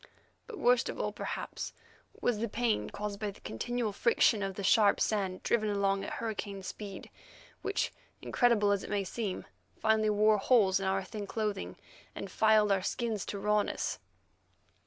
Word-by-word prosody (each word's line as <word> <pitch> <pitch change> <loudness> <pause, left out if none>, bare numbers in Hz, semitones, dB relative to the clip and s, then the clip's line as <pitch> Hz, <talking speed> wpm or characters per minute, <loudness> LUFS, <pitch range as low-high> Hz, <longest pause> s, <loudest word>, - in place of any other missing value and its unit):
But 455 -3 -8
worst 245 -5 +3
of - - -5
all - - -1
perhaps, - - -5 0.5
was 235 -4 +1
the 230 0 -1
pain 230 0 0
caused 205 -1 -5
by 210 -1 -2
the 200 - -11
continual 230 - -3
friction 230 0 +3
of 195 -1 -2
the 200 - -5
sharp 200 +1 +5
sand 195 -4 0
driven 215 -2 +1
along 195 -1 +1
at - - -5
hurricane 205 -3 -4
speed, 195 0 -7 0.5
which, - - -1 0.3
incredible 230 -5 +3
as 200 -1 +1
it - - -7
may 205 -1 0
seem, 195 0 -4 0.3
finally 220 -1 +2
wore 210 0 +4
holes 195 -4 +4
in 195 - -2
our 195 0 +1
thin 205 +2 -6
clothing 205 - -3 0.4
and 195 - -6
filed 215 -1 +4
our 195 -1 +3
skins 220 +1 -2
to 205 - -3
rawness. 210 +1 0
210 Hz, 165 wpm, -31 LUFS, 195-220 Hz, 0.5 s, sharp